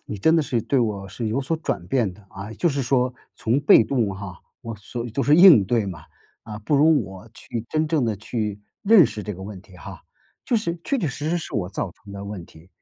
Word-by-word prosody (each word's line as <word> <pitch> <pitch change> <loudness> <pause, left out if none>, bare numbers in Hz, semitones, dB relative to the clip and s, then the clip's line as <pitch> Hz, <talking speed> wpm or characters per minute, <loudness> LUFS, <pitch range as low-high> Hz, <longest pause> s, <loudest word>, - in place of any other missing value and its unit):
你 105 - -6
真 160 +10 +4
的 160 - +3
是 125 -4 -1
对 135 - 0
我 105 -5 -2
是 115 +2 -4
有 115 +6 -1
所 150 +5 -2
转 95 - -4
变 120 -8 +1
的 100 +1 -19
啊， 100 +3 -8
就 170 - 0
是 140 -3 -1
说 125 0 +1 0.2
从 120 +4 0
被 140 - +7
动 115 -3 0
哈， 95 -2 -8 0.2
我 115 -3 -6
所 115 +4 -6
就 135 +5 -2
是 145 - +4
应 170 - +8
对 110 0 0
嘛， 90 -4 -6 0.4
啊， 105 -1 -8
不 115 +8 0
如 150 -1 +4
我 95 +3 -11
去 115 -1 -6
真 155 0 0
正 155 -5 +1
地 110 -2 0
去 105 -1 -4 0.2
认 205 -6 +7
识 105 - -7
这 105 - -5
个 95 - -10
问 100 0 -8
题 95 -2 -19
哈， - - -10 0.4
就 - - -1
是 170 -5 -2
确 275 - 0
确 175 - -1
实 145 +4 -4
实 175 - +1
是 165 - -8
我 90 -5 -1
造 - - -3
成 100 - -15
的 100 0 -7
问 100 -4 -7
题。 80 +1 -18
115 Hz, 260 characters per minute, -23 LUFS, 100-145 Hz, 0.4 s, 应